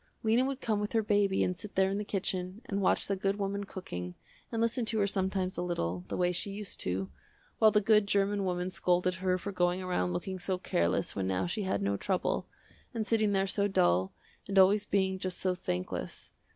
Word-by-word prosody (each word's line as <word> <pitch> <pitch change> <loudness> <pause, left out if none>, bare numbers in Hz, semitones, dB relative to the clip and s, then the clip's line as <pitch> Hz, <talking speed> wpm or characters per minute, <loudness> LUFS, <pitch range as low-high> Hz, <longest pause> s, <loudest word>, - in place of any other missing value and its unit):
Lena 225 +3 +3
would 270 0 -3
come 215 -2 0
with 210 0 -3
her 225 -1 +2
baby 205 -2 +2
and 180 - 0
sit 205 +3 -10
there 190 0 +3
in 200 - -1
the - - -2
kitchen, 190 +1 -3
and 200 -4 -2
watch 190 - +3
the 195 - -1
good 195 +1 -1
woman 200 0 -2
cooking, 90 - -6 0.4
and 230 - -2
listen 230 +2 +1
to 220 0 0
her 205 - +3
sometimes 190 -1 -1
a - - -1
little, 90 - -2
the - - -4
way 180 0 +2
she 180 +3 -1
used 200 0 -6
to, 95 +1 -2 0.5
while 220 - +7
the 210 0 +3
good 210 0 +4
german 200 0 +1
woman 180 0 -1
scolded 180 0 +2
her 185 0 0
for 200 +2 -5
going 180 -1 +1
around 180 - -1
looking 185 - -3
so 185 +1 -1
careless 85 - 0
when 95 -1 -1
now 95 -1 0
she 195 +5 -2
had 185 - -1
no 100 0 0
trouble, 185 - -1 0.5
and 220 -2 -1
sitting 220 -2 +2
there 195 -1 +2
so 200 +1 +1
dull, 90 - +2 0.4
and 195 0 -2
always 200 +2 +6
being 190 -2 +1
just 185 -1 -3
so 185 -1 +1
thankless. 90 - -4
190 Hz, 215 wpm, -31 LUFS, 180-205 Hz, 0.5 s, while